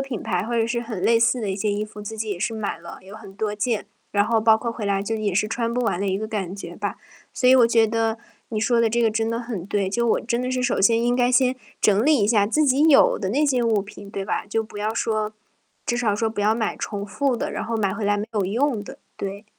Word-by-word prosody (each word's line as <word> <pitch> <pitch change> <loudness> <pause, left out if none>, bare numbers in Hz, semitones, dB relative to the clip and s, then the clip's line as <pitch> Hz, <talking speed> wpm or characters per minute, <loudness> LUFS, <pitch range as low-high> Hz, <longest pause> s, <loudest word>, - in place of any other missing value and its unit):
品 270 -5 -4
牌 180 0 -1
或 235 +3 -3
者 225 -1 +2
是 235 +1 -1
很 225 -6 -6
类 230 0 +4
似 235 +2 +3
的 210 -4 -2
一 - - -1
些 205 +2 -1
衣 205 +1 -1
服， 210 0 -11
自 210 +2 -7
己 220 0 -3
也 195 - -3
是 225 +5 -2
买 210 -6 -3
了 170 - -10
有 195 +2 -12
很 205 -3 -11
多 210 +1 -2
件， 215 0 -1 0.3
然 205 0 +2
后 230 -1 +2
包 220 0 +5
括 235 +1 -3
回 220 -3 -5
来 195 -1 +1
就 225 +3 -2
也 210 -3 -1
是 210 - +2
穿 230 +1 -2
不 250 - 0
完 200 -6 0
的 200 - -1
一 190 - 0
个 215 +2 -4
感 200 -4 -4
觉 - - -8
吧。 - - -4 0.4
所 250 - 0
以 260 - +8
我 250 -3 +6
觉 230 -1 +4
得， 225 0 0 0.3
你 220 - -3
说 235 +2 +2
的 230 - +3
这 235 +2 +1
个 230 - +4
真 225 +1 -1
的 230 - -1
很 230 -7 -5
对， 200 0 -1
就 235 +4 0
我 - - +2
真 240 +1 -1
的 255 - -2
是 255 0 -1
首 250 -5 +1
先 230 +4 +4
应 245 0 +2
该 245 0 +2
先 255 0 +3 0.3
整 210 +2 +3
理 300 0 +4
一 205 - +2
下 210 -2 +3
自 305 +8 +2
己 270 +1 +3
有 280 - +6
的 190 - -2
那 285 +9 +2
些 255 -4 +2
物 225 -3 +2
品， 200 0 -10
对 195 -1 -4
吧？ - - -2
就 215 +2 -1
不 215 -1 -10
要 215 +2 -1
说 215 -2 -1 0.5
至 240 - 0
少 220 -4 +1
说 225 +1 0
不 220 -1 -4
要 210 +1 +3
买 225 -1 -1
重 205 -1 -4
复 265 +5 0
的， - - -3
然 - - -3
后 230 - -2
买 200 -3 0
回 215 0 -4
来 205 0 +2
没 205 +1 -3
有 210 -3 0
用 230 +3 0
的， - - -11 0.2
对。 200 +1 -5
220 Hz, 310 characters per minute, -23 LUFS, 205-235 Hz, 0.5 s, 以